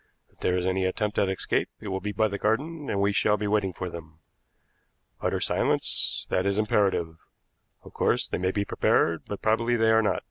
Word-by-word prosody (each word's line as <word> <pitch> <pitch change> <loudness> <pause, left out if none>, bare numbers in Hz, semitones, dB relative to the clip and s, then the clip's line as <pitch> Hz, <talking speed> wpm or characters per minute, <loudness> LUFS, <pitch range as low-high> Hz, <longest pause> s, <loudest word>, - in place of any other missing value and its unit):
If - - -32
there 90 - +1
is 90 - -1
any 95 0 0
attempt 105 +3 -1
at 100 - +2
escape 95 - -1
it 105 - -7
will 95 0 -2
be 105 +2 -4
by 110 +2 +2
the 100 -1 -5
garden, 145 +8 -1
and 100 - -1
we 100 +1 +2
shall 105 +1 +2
be 105 - -3
waiting 105 -2 +1
for 90 +1 -5
them. 80 -2 -10 1.0
Utter - - 0
silence; - - +1
that 90 - +2
is 100 0 0
imperative. 100 -6 +1 0.7
Of - - -14
course, - - +1
they - - -3
may 95 +1 0
be 100 +1 -1
prepared, 85 -4 +1
but 100 - -6
probably 115 +2 +2
they 110 -1 +3
are 110 0 +5
not. 105 -5 0
100 Hz, 210 wpm, -26 LUFS, 95-110 Hz, 1.0 s, are